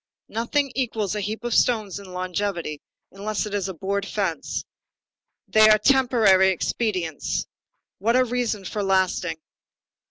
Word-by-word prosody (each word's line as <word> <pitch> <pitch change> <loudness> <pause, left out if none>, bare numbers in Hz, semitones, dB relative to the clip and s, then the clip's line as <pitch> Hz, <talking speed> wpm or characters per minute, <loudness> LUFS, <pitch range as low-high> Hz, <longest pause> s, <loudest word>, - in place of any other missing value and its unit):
Nothing 275 +5 0
equals 220 -7 -1
a 210 - -2
heap 215 +3 -4
of 240 -1 -2
stones 215 -6 +2
in 195 -2 -11
longevity, 180 -4 -3 0.3
unless 205 +3 -3
it 210 - -6
is 195 -2 -1
a - - -4
board 200 +4 -2
fence. 200 - -3 0.8
They 215 0 +6
are 215 - +7
temporary 220 -6 +4
expedients. 185 -4 -1 0.5
What 230 +5 +2
a 255 - +5
reason 235 -5 -2
for 210 - -3
lasting! 185 -3 +1
205 Hz, 135 wpm, -24 LUFS, 190-230 Hz, 0.8 s, are